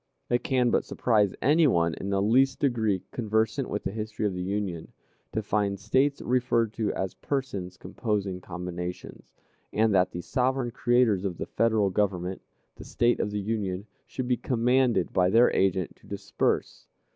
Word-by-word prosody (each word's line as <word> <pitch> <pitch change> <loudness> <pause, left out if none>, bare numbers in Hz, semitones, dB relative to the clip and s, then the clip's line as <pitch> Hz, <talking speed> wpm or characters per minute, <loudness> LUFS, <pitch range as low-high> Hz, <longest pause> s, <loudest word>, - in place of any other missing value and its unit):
It 120 - +2
can 125 -3 +2
but - - +2
surprise 105 -5 +1
any 150 +5 +5
one 85 -8 +2
in 100 - -5
the 100 0 +1
least 130 +5 +3
degree 110 - 0
conversant 110 +3 0
with 105 - -3
the - - -2
history 110 0 -4
of 100 - 0
the 90 - -4
Union, 95 -3 -3 0.4
to 110 - -2
find 100 -1 0
States 130 +7 +1
referred 120 -3 +1
to 110 -3 -1
as 95 -1 -2
"persons 100 -10 -4
composing 100 -5 -3
combinations," 90 0 -6 0.5
and 110 0 +2
that 90 -1 +4
the 85 - -6
sovereign 130 +3 0
creators 120 -5 +2
of 95 -4 -3
the - - -4
Federal 110 -4 +1
Government, 95 -2 -1 0.4
the - - -9
States 120 0 +1
of - - -1
the 105 0 -3
Union, 100 -2 -2 0.2
should 130 -2 -4
be 125 -1 +2
commanded 125 -4 +1
by 90 0 +3
their 115 +4 +5
agent 95 -2 +1
to - - -21
disperse. - - -2
105 Hz, 170 wpm, -27 LUFS, 95-120 Hz, 0.5 s, any